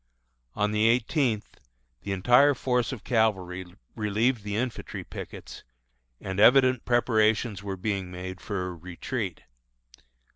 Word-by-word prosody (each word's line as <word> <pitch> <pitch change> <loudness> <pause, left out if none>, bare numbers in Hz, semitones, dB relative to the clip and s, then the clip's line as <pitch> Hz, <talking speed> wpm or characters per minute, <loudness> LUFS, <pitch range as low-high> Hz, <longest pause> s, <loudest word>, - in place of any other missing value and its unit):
On 105 0 +1
the 105 +1 +3
eighteenth, 120 -1 0 0.4
the 100 - -5
entire 125 +9 +5
force 125 -2 0
of 130 -6 -7
cavalry 95 -6 0 0.3
relieved 110 +3 +1
the 105 0 -4
infantry 120 +2 -4
pickets, - - -9 0.6
and 95 +1 -4
evident 130 +2 +5
preparations 110 -3 +2
were 100 -1 -5
being 95 -1 -2
made 95 +1 -7
for 100 -3 -3
a - - -6
retreat. 90 +5 -5
110 Hz, 120 wpm, -27 LUFS, 95-120 Hz, 0.6 s, entire